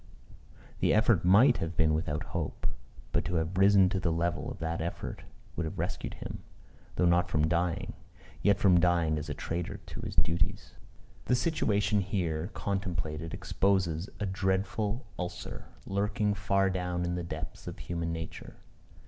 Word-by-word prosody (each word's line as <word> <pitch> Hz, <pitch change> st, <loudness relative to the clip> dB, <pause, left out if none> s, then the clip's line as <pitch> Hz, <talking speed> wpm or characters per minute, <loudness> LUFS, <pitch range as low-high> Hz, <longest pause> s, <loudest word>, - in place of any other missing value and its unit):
The -, -, +3 dB
effort -, -, +4 dB
might 100 Hz, +9 st, +6 dB
have 80 Hz, 0 st, -4 dB
been 80 Hz, -1 st, +4 dB
without 75 Hz, -1 st, -1 dB
hope; -, -, -3 dB, 0.5 s
but -, -, +1 dB
to 90 Hz, -, -1 dB
have 80 Hz, +2 st, 0 dB
risen 95 Hz, 0 st, +6 dB
to 95 Hz, -, -1 dB
the 85 Hz, -3 st, 0 dB
level 85 Hz, +1 st, -1 dB
of -, -, -6 dB
that 80 Hz, 0 st, -2 dB
effort, 85 Hz, +2 st, -5 dB, 0.3 s
would 85 Hz, -, -1 dB
have -, -, -6 dB
rescued -, -, -3 dB
him, -, -, -6 dB, 0.6 s
though 90 Hz, -, +2 dB
not 90 Hz, 0 st, +3 dB
from 75 Hz, 0 st, +2 dB
dying, 85 Hz, 0 st, 0 dB, 0.5 s
yet 100 Hz, -1 st, +4 dB
from 95 Hz, -3 st, +5 dB
dying 85 Hz, -3 st, +3 dB
as 75 Hz, +1 st, -6 dB
a 75 Hz, -, -3 dB
traitor 85 Hz, +3 st, -3 dB
to -, -, -9 dB
his -, -, -5 dB
duties. 85 Hz, -2 st, 0 dB, 0.5 s
The 125 Hz, -, +3 dB
situation 105 Hz, -8 st, +2 dB
here 90 Hz, -3 st, -1 dB
contemplated 85 Hz, -5 st, -2 dB
exposes 95 Hz, -2 st, 0 dB
a 105 Hz, -, 0 dB
dreadful 100 Hz, +4 st, 0 dB
ulcer, 90 Hz, -1 st, -5 dB, 0.2 s
lurking 105 Hz, +1 st, 0 dB
far 100 Hz, -1 st, +2 dB
down 90 Hz, -1 st, -1 dB
in 90 Hz, -, -1 dB
the 90 Hz, -, -2 dB
depths 80 Hz, -2 st, -6 dB
of -, -, -5 dB
human 85 Hz, +4 st, -3 dB
nature. 80 Hz, -1 st, -6 dB
90 Hz, 160 wpm, -30 LUFS, 80-100 Hz, 0.6 s, might